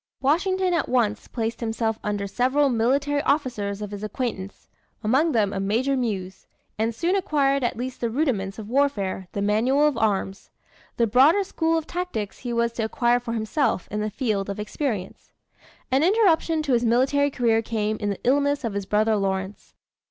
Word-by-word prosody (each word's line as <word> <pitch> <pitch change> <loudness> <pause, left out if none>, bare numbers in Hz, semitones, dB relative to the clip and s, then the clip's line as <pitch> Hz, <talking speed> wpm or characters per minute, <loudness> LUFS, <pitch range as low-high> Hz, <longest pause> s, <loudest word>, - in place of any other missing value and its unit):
Washington 365 +6 +1
at 335 - 0
once 225 -4 0
placed 225 -1 -3
himself 225 -1 -2
under 205 -1 -2
several 260 +7 +2
military 275 +5 +1
officers 215 -9 -1
of 205 - -6
his 205 0 -7
acquaintance, 210 -3 -5 0.4
among 270 +10 +2
them 210 -6 +1
a 195 - -2
Major 230 +8 +1
Muse, 195 -7 -3 0.3
and 225 +1 -1
soon 345 +9 0
acquired 280 -7 +1
at 240 - -1
least 250 +1 -5
the 235 - 0
rudiments 220 -8 -1
of 215 -2 -7
warfare, 215 -8 0
the 200 - -2
manual 240 +8 +2
of 290 -6 +1
arms. 195 -2 -1 0.5
The 235 - +3
broader 270 - +5
school 330 -3 0
of 320 - -3
tactics 345 - -4
he 245 - -5
was 235 0 +1
to 230 - -2
acquire 240 +2 +2
for 240 -1 -5
himself 225 - 0
in 210 +1 -2
the 215 - -1
field 210 -3 -2
of 200 +1 -4
experience. 210 -3 -4 0.6
An 265 +2 +3
interruption 335 -5 +3
to 280 -4 0
his 240 0 +2
military 265 +5 +2
career 230 -4 +1
came 215 -1 -2
in 205 - -2
the 200 - -4
illness 285 +2 +2
of 230 -3 -2
his 200 -1 -4
brother 215 +2 +2
Lawrence. 190 0 -3
235 Hz, 180 wpm, -24 LUFS, 210-280 Hz, 0.6 s, broader